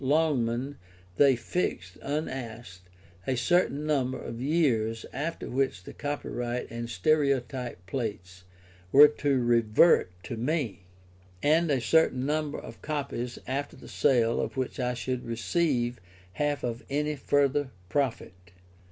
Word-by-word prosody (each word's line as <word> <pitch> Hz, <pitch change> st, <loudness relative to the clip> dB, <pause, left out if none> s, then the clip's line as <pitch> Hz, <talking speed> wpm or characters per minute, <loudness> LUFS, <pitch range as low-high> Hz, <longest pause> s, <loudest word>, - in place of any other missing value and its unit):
Longman 135 Hz, -3 st, +1 dB, 0.4 s
they 140 Hz, -2 st, +6 dB
fixed, 115 Hz, -, -3 dB
unasked, 120 Hz, -, -5 dB, 0.4 s
a 130 Hz, -, +1 dB
certain 150 Hz, +2 st, +2 dB
number 135 Hz, -4 st, 0 dB
of 115 Hz, +1 st, -6 dB
years 125 Hz, -7 st, +1 dB
after 155 Hz, +5 st, -3 dB
which 130 Hz, -7 st, -1 dB
the -, -, -10 dB
copyright 125 Hz, -5 st, -3 dB
and 115 Hz, 0 st, -5 dB
stereotype 125 Hz, -, 0 dB
plates 95 Hz, -5 st, -5 dB, 0.5 s
were 145 Hz, +2 st, +10 dB
to 145 Hz, -2 st, 0 dB
revert 120 Hz, -, +4 dB
to 120 Hz, -, -5 dB
me, 120 Hz, -, -2 dB, 0.6 s
and 160 Hz, +3 st, +4 dB
a 140 Hz, -3 st, +2 dB
certain 130 Hz, 0 st, +3 dB
number 150 Hz, 0 st, -1 dB
of -, -, -10 dB
copies 140 Hz, -5 st, -3 dB
after 140 Hz, +3 st, -3 dB
the -, -, -13 dB
sale 120 Hz, -5 st, +2 dB
of -, -, -4 dB
which 130 Hz, 0 st, -2 dB
I 125 Hz, -1 st, 0 dB
should 125 Hz, +1 st, -3 dB
receive 120 Hz, -, 0 dB, 0.3 s
half 145 Hz, +2 st, -1 dB
of 120 Hz, -1 st, -3 dB
any 150 Hz, +2 st, 0 dB
further 145 Hz, 0 st, +1 dB, 0.2 s
profit. 130 Hz, -4 st, -1 dB
130 Hz, 125 wpm, -28 LUFS, 115-145 Hz, 0.6 s, were